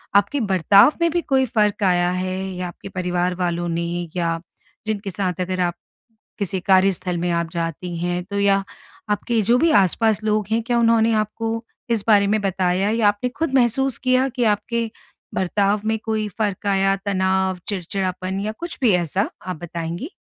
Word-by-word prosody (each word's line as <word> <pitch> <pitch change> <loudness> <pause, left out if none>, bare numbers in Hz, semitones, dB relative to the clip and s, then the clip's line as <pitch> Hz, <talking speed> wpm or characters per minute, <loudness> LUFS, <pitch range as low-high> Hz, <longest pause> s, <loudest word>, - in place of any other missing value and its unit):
आपके 205 +8 +3
बर्ताव 195 - +6
में 335 - +4
भी 345 +2 0
कोई 265 -4 +2
फ़र्क 210 -3 +1
आया 175 -2 +3
है 185 0 -2 0.2
या 180 0 -3
आपके 175 +2 -10
परिवार 180 -1 -1
वालों 175 -1 -1
ने 170 0 -1 0.3
या 165 -2 0 0.5
जिनके 205 -2 -2
साथ 185 -1 -2
अगर 185 0 -2
आप, 175 -1 +1 0.7
किसी 195 -2 -1
कार्यस्थल 185 -1 +2
में 175 +1 -1
आप 170 -1 -1
जाती 170 +1 -4
हैं, 175 +1 -1
तो 200 +2 -4
या 200 -1 +3 0.5
आपके 220 +3 0
जो 235 +5 +3
भी 330 +5 +3
आसपास 215 +4 +1
लोग 215 -1 +1
हैं, 225 +1 +1
क्या 235 +1 0
उन्होंने 230 -1 +4
आपको 225 +2 -4 0.3
इस 225 -3 +1
बारे 205 -2 +5
में 215 +2 +1
बताया 190 0 0
या 225 -1 +3
आपने 205 +4 0
खुद 315 -4 -1
महसूस 260 +1 +2
किया 255 +1 +2
कि 250 -1 -2
आपके 230 +2 -3 0.4
बर्ताव 200 +2 +1
में 220 0 0
कोई 220 -1 -1
फ़र्क 205 -2 -2
आया, 195 0 +2
तनाव, 190 -1 +1
चिड़चिड़ापन 185 0 -3
या 210 +2 -2
कुछ 340 0 -6
भी 235 -5 +5
ऐसा? 185 +5 -1 0.2
आप 185 -2 -3
बताएँगी? 170 - -5
200 Hz, 175 wpm, -21 LUFS, 180-220 Hz, 0.7 s, बर्ताव